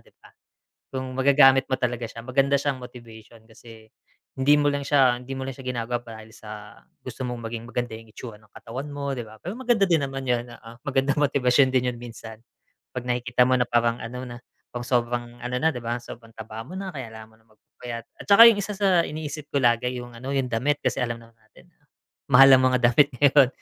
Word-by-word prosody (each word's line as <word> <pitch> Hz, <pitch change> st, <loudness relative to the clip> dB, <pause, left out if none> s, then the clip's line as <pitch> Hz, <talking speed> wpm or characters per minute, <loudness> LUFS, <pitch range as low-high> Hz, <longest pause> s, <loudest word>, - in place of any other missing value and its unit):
'di -, -, -25 dB
ba. -, -, -20 dB, 0.6 s
Yung 130 Hz, -1 st, -5 dB
magagamit 135 Hz, 0 st, +5 dB
mo 130 Hz, -, 0 dB
talaga 120 Hz, -2 st, -2 dB
siya 115 Hz, +1 st, -8 dB
maganda 135 Hz, +3 st, +1 dB
siya 140 Hz, -2 st, -1 dB
motivation 115 Hz, -2 st, -13 dB
kasi, 110 Hz, -1 st, -15 dB, 0.5 s
hindi 140 Hz, +3 st, +4 dB
mo 145 Hz, -, +2 dB
lang 140 Hz, -1 st, -2 dB
siya 135 Hz, -4 st, +3 dB
hindi 125 Hz, +2 st, -9 dB
mo 135 Hz, 0 st, -5 dB
lang 135 Hz, -, -6 dB
siya 135 Hz, -, -11 dB
ginagawa 120 Hz, -1 st, -3 dB
dahil 110 Hz, -1 st, -11 dB
sa 105 Hz, -1 st, -11 dB, 0.2 s
gusto 130 Hz, -, -7 dB
mong 125 Hz, -1 st, -4 dB
maging 115 Hz, 0 st, -6 dB
maganda 120 Hz, -2 st, -4 dB
yung 110 Hz, -1 st, -15 dB
itsura 115 Hz, -3 st, -9 dB
ng 105 Hz, -1 st, -25 dB
katawan 130 Hz, +6 st, -7 dB
mo 140 Hz, -1 st, -4 dB
'di 120 Hz, -, -5 dB
ba, 110 Hz, 0 st, -15 dB
pero 185 Hz, +7 st, -6 dB
maganda 235 Hz, -6 st, +1 dB
din 160 Hz, -5 st, +2 dB
naman 135 Hz, -1 st, -6 dB
yun 120 Hz, -1 st, +1 dB
oo, 115 Hz, -1 st, -13 dB
magandang 135 Hz, 0 st, 0 dB
motibasyon 130 Hz, -2 st, +3 dB
din 125 Hz, -1 st, +1 dB
yun -, -, -10 dB
minsan. 115 Hz, -2 st, -10 dB, 0.6 s
'Pag 125 Hz, -1 st, -5 dB
nakikita 125 Hz, +1 st, +1 dB
mo 130 Hz, -, +3 dB
na 125 Hz, -, +2 dB
parang 120 Hz, 0 st, +1 dB
ano 125 Hz, +2 st, -7 dB
na 120 Hz, -, -8 dB, 0.4 s
kung 120 Hz, 0 st, -5 dB
sobrang 120 Hz, -1 st, -1 dB
ano 125 Hz, +1 st, -3 dB
na 160 Hz, -, +3 dB
'di 125 Hz, -, -6 dB
ba, 120 Hz, +1 st, -2 dB
sobrang 115 Hz, -1 st, -12 dB
taba 110 Hz, 0 st, -8 dB
mo 155 Hz, -, -13 dB
na. 195 Hz, 0 st, -5 dB
Kaya 130 Hz, -8 st, -8 dB
kailangan 110 Hz, 0 st, -11 dB
mo 110 Hz, -, -24 dB
na 110 Hz, -, -31 dB
magpapayat 115 Hz, +2 st, -9 dB
at -, -, -10 dB
saka 200 Hz, +3 st, +8 dB
yung 225 Hz, -, +4 dB
isa 210 Hz, -, -4 dB
sa 190 Hz, -4 st, +3 dB
iniisip 150 Hz, -1 st, -6 dB
ko 140 Hz, -, +1 dB
lagi 120 Hz, +1 st, +2 dB
yung 120 Hz, 0 st, -9 dB
ano 130 Hz, +4 st, -6 dB
yung 135 Hz, -2 st, 0 dB
damit 140 Hz, +6 st, 0 dB
kasi 125 Hz, -, -1 dB
alam 120 Hz, -1 st, -3 dB
naman 115 Hz, 0 st, -19 dB
natin, 110 Hz, +9 st, -22 dB, 0.6 s
mahal 135 Hz, +1 st, +8 dB
ang 130 Hz, -, +2 dB
mga 125 Hz, -, +3 dB
damit 140 Hz, +4 st, +5 dB
ngayon, 140 Hz, -2 st, +6 dB
125 Hz, 220 wpm, -24 LUFS, 115-135 Hz, 0.6 s, saka